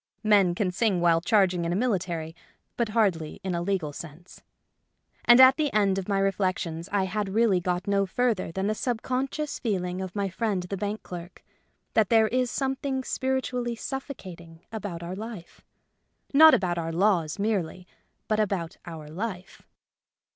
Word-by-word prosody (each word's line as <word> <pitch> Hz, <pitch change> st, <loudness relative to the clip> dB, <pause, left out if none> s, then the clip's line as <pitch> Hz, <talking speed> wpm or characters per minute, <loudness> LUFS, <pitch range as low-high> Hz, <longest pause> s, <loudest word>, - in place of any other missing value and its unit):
Men 200 Hz, -5 st, +4 dB
can 185 Hz, -1 st, 0 dB
sing 195 Hz, -1 st, +1 dB
while 170 Hz, -1 st, +3 dB
charging 185 Hz, -3 st, +2 dB
in 170 Hz, -, -1 dB
a -, -, 0 dB
military, 175 Hz, -8 st, -1 dB, 0.4 s
but 235 Hz, -2 st, -1 dB
hardly 195 Hz, -9 st, 0 dB
in 190 Hz, -1 st, -2 dB
a 170 Hz, -, -1 dB
legal 175 Hz, -5 st, -1 dB
sense. 170 Hz, +3 st, -11 dB, 0.8 s
And 240 Hz, +1 st, +8 dB
at 260 Hz, 0 st, +8 dB
the 300 Hz, -2 st, 0 dB
end 200 Hz, -2 st, +2 dB
of 190 Hz, -, -7 dB
my 200 Hz, -, +1 dB
reflections 185 Hz, -3 st, -1 dB
I 200 Hz, -1 st, +2 dB
had 200 Hz, +2 st, -2 dB
really 210 Hz, -2 st, +3 dB
got 180 Hz, +1 st, -2 dB
no 200 Hz, -1 st, +1 dB
further 225 Hz, -4 st, 0 dB
than 190 Hz, +3 st, -2 dB
the 215 Hz, -, +1 dB
subconscious 260 Hz, +6 st, -2 dB
feeling 185 Hz, -5 st, -2 dB
of 185 Hz, 0 st, -6 dB
my 200 Hz, -1 st, 0 dB
friend 195 Hz, -1 st, -2 dB
the 180 Hz, +2 st, -4 dB
bank 205 Hz, +2 st, -4 dB
clerk 175 Hz, 0 st, -9 dB, 0.3 s
— -, -, -47 dB
that 220 Hz, -3 st, +3 dB
there 225 Hz, -1 st, +5 dB
is 250 Hz, 0 st, +1 dB
something 270 Hz, 0 st, -2 dB
spiritually 255 Hz, -2 st, -2 dB
suffocating 185 Hz, -, -8 dB
about 195 Hz, -6 st, -5 dB
our 175 Hz, +2 st, -5 dB
life; 210 Hz, -4 st, -9 dB, 0.7 s
not 315 Hz, +3 st, +9 dB
about 175 Hz, -2 st, -1 dB
our 165 Hz, 0 st, -3 dB
laws 170 Hz, -3 st, +1 dB
merely, 190 Hz, -4 st, -2 dB, 0.4 s
but 215 Hz, -1 st, +1 dB
about 190 Hz, -5 st, -1 dB
our 160 Hz, -3 st, -8 dB
life. 190 Hz, +3 st, -6 dB
195 Hz, 165 wpm, -26 LUFS, 175-225 Hz, 0.8 s, not